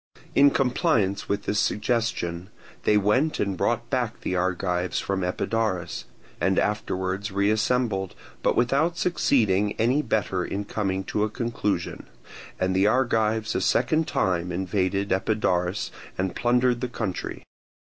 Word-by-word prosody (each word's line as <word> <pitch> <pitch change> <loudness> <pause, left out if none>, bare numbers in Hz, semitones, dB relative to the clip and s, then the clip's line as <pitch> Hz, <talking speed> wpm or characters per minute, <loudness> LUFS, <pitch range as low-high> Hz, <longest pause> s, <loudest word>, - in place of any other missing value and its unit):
In 140 +1 +7
compliance 125 - +1
with 100 0 -1
this 105 - 0
suggestion, 105 -6 -1 0.4
they 105 - +5
went 115 +10 +2
and 100 -2 0
brought 120 +5 0
back 125 -4 -1
the 95 - -2
Argives 90 0 0
from 95 -1 -2
Epidaurus, 95 0 -1 0.3
and 95 0 +1
afterwards 100 -1 -1
reassembled, 105 0 +1 0.3
but - - +2
without 140 +8 +2
succeeding 105 - +2
any 125 +6 +2
better 95 -8 0
in 100 +1 -3
coming 95 -2 -2
to 105 +2 -1
a 110 - 0
conclusion; 105 -6 -2 0.5
and 95 0 +1
the 95 +2 +4
Argives 110 -2 +1
a - - 0
second 155 +6 +2
time 90 -1 0
invaded 95 +2 -1
Epidaurus 95 -2 0 0.3
and 95 -1 -1
plundered 125 0 +2
the 125 - -2
country. 105 -6 -4
105 Hz, 130 wpm, -25 LUFS, 95-120 Hz, 0.5 s, In